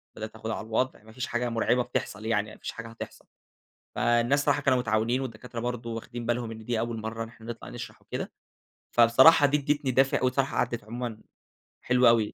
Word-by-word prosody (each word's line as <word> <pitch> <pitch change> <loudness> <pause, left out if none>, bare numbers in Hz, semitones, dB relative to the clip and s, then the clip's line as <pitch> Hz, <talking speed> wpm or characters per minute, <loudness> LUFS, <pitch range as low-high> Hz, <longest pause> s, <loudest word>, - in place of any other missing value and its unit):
بدأت 110 0 -7
آخُد 110 0 -6
على 110 -1 -3
الوضع، 115 0 -1
ما 110 - -15
فيش 125 +3 -4
حاجة 120 +1 -1
مُرعبة 120 +2 +2
بتحصل 105 -2 -4
يعني 110 -1 0
ما - - -13
فيش - - -5
حاجة 115 0 -8
هتحصل. 115 - -9 0.7
فالناس 120 +3 +3
صراحة 145 0 +3
كانوا 130 -3 +3
متعاونين 115 +2 +1
والدكاترة 120 -1 -6
برضه 120 0 -3
واخدين 115 +1 -6
بالهم 120 -1 -1
إن 110 -1 -9
دي 120 -2 0
أول 115 0 -2
مرّة 110 +1 -4
إن - - -7
إحنا 115 -1 -15
نطلع 120 -1 -7
نشرح - - -8
وكده. - - -5 0.6
فبصراحة 130 +7 +7
دي 145 +1 +2
ادّتني 145 -1 0
دافع 135 +2 +3
وبصراحة 130 +2 +1
عَدِّت 120 -3 -1
عمومًا 115 -1 -5 0.6
حلو 125 0 +4
أوي. 115 -2 +4
120 Hz, 195 wpm, -28 LUFS, 115-125 Hz, 0.7 s, فبصراحة